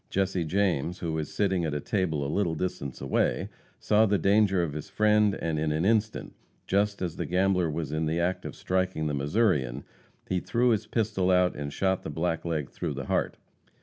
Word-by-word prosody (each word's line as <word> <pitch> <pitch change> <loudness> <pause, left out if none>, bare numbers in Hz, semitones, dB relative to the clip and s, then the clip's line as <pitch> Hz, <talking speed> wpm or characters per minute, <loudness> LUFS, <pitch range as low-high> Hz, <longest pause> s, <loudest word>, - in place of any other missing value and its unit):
Jesse 95 -3 0
James, 90 -1 0
who 85 -3 -3
was 80 -2 -3
sitting 95 -4 +1
at 75 -2 -1
a - - 0
table 80 - -1
a - - -1
little 85 +2 0
distance 75 -5 -4
away, 65 - 0 0.3
saw 110 +1 +3
the 100 0 +2
danger 100 -2 +3
of 75 -4 -3
his 75 0 -6
friend, 105 -1 +3
and 80 -2 -1
in 75 0 0
an 80 +4 0
instant, 110 0 0 0.3
just 100 0 0
as 85 -3 -3
the - - -2
gambler 90 -1 +2
was 75 -1 -3
in 80 +1 -1
the 80 +2 0
act 90 +2 0
of - - -7
striking 95 -4 -1
the 75 - -1
Missourian, 70 - +1 0.4
he 90 - 0
threw 120 +6 +1
his 110 -2 +1
pistol 105 -5 0
out 90 -1 +3
and 70 -1 -5
shot 95 +4 0
the - - -6
blackleg 80 -2 -2
through - - -4
the - - -5
heart. - - -1
90 Hz, 200 wpm, -28 LUFS, 80-100 Hz, 0.4 s, saw